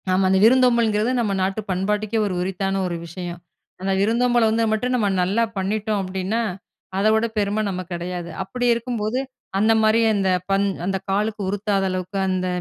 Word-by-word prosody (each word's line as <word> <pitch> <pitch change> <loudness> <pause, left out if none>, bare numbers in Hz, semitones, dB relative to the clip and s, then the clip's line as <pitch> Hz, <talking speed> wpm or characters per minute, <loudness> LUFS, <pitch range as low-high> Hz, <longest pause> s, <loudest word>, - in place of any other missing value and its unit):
ஆமா 185 +1 +3
அந்த 190 0 +3
விருந்தோம்பல்ங்கறது 235 -2 +4
நம்ம 220 -4 0
நாட்டு 195 +3 -1
பண்பாட்டுக்கே 210 +4 0
ஒரு 195 - -2
உரித்தான 195 +1 -1
ஒரு 175 - -3
விஷயம். 175 0 -7 0.4
அந்த 195 +1 -1
விருந்தோம்பல் 235 +2 +3
வந்தா 225 +1 +1
மட்டும் 245 +4 0
நம்ம 220 -4 +1
நல்லா 200 +6 +1
பண்ணிட்டோம் 210 +2 -1
அப்டின்னா, 190 +4 -2 0.6
அத 200 +2 +2
விட 220 +1 +2
பெரும 210 +1 +1
நம்ம 185 -1 -3
கிடையாது. 175 0 -4
அப்டி 245 +6 -3
இருக்கும்போது, 235 0 -2 0.4
அந்த 215 +3 +3
மாரி 220 +1 +4
அந்த 195 -2 +1 0.2
பண்-அந்த 195 -1 0
காலுக்கு 210 +2 0
உருத்தாத 200 0 0
அளவுக்கு 185 +2 -4
அந்த 185 -1 0
205 Hz, 155 wpm, -22 LUFS, 190-220 Hz, 0.6 s, விருந்தோம்பல்ங்கறது